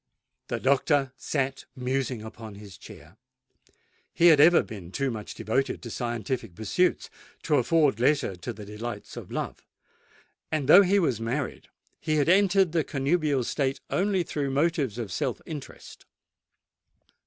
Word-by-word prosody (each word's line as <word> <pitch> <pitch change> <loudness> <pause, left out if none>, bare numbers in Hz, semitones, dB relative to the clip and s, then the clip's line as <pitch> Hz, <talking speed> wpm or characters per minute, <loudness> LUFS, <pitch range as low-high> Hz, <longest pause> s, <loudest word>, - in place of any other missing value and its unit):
The - - -3
doctor 140 0 +2
sate 135 -2 -2
musing 130 -3 -2
upon 110 -1 -9
his 100 -2 -11
chair. - - -14 0.9
He 175 +1 +5
had 155 -3 +6
ever 170 +4 +7
been 95 -5 -10
too 135 +4 -1
much 110 -2 -7
devoted 115 +5 -1
to 120 - -7
scientific 120 -4 -3
pursuits 110 - 0 0.4
to 150 -2 +2
afford 140 -1 +2
leisure 135 -5 +2
for 120 - -4
the 105 -2 -10
delights 105 +1 -7
of - - -8
love; - - -4 0.9
and 155 -4 -1
though 195 - +9
he 200 +1 +3
was 130 - +1
married, 125 +5 -3 0.3
he 155 0 -1
had 150 +1 +2
entered 190 -1 +4
the 165 -1 +1
connubial 145 -1 0
state 135 +2 -1
only 190 -1 +1
through 145 -4 -3
motives 140 - 0
of 115 -5 -5
self - - -2
interest. 150 -4 -10
135 Hz, 145 wpm, -27 LUFS, 115-155 Hz, 0.9 s, though